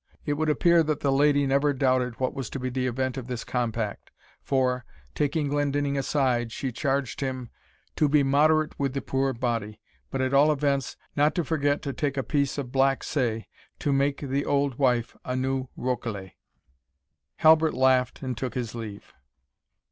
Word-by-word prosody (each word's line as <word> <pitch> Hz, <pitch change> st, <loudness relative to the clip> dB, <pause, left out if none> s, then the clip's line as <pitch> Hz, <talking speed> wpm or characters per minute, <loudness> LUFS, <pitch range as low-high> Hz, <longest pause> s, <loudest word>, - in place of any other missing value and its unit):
It 145 Hz, -, 0 dB
would 155 Hz, +1 st, 0 dB
appear 170 Hz, +3 st, +4 dB
that 155 Hz, -2 st, -1 dB
the 140 Hz, -, +2 dB
lady 145 Hz, +1 st, +3 dB
never 140 Hz, +2 st, +2 dB
doubted 130 Hz, -3 st, +1 dB
what 130 Hz, -, 0 dB
was 135 Hz, -5 st, -5 dB
to 135 Hz, -, -5 dB
be 130 Hz, 0 st, -3 dB
the 130 Hz, 0 st, -1 dB
event 130 Hz, +1 st, -2 dB
of 125 Hz, -2 st, -5 dB
this 125 Hz, -2 st, -4 dB
compact, 115 Hz, -4 st, -3 dB, 0.3 s
for, 125 Hz, -2 st, 0 dB, 0.3 s
taking 150 Hz, +1 st, 0 dB
Glendinning 145 Hz, 0 st, 0 dB
aside, 130 Hz, -4 st, 0 dB
she 130 Hz, +2 st, -3 dB
charged 135 Hz, -1 st, -1 dB
him, 130 Hz, -3 st, -4 dB, 0.5 s
"to 150 Hz, -, +3 dB
be 145 Hz, 0 st, +4 dB
moderate 155 Hz, +3 st, +2 dB
with 140 Hz, -1 st, -1 dB
the 135 Hz, -, -1 dB
puir 135 Hz, 0 st, 0 dB
body, 115 Hz, -4 st, -3 dB, 0.3 s
but 135 Hz, -, -3 dB
at 130 Hz, +1 st, 0 dB
all 145 Hz, +2 st, +6 dB
events, 140 Hz, -2 st, 0 dB, 0.2 s
not 150 Hz, +1 st, +3 dB
to 175 Hz, -, +1 dB
forget 145 Hz, -2 st, 0 dB
to 140 Hz, -, -3 dB
take 140 Hz, -1 st, -2 dB
a 135 Hz, -, 0 dB
piece 140 Hz, +4 st, 0 dB
of 130 Hz, -4 st, -4 dB
black 135 Hz, 0 st, +2 dB
say, 115 Hz, -6 st, -1 dB, 0.3 s
to 145 Hz, -, 0 dB
make 140 Hz, +1 st, +1 dB
the 140 Hz, 0 st, -1 dB
auld 140 Hz, -2 st, 0 dB
wife 125 Hz, -4 st, +1 dB
a 125 Hz, -, -3 dB
new 130 Hz, 0 st, -1 dB
rokelay." 115 Hz, -7 st, -3 dB, 1.0 s
Halbert 160 Hz, 0 st, +5 dB
laughed 130 Hz, 0 st, +2 dB
and 130 Hz, -2 st, -2 dB
took 125 Hz, +1 st, -4 dB
his 120 Hz, -3 st, -3 dB
leave. 110 Hz, -4 st, -8 dB
135 Hz, 180 wpm, -26 LUFS, 125-145 Hz, 1.0 s, all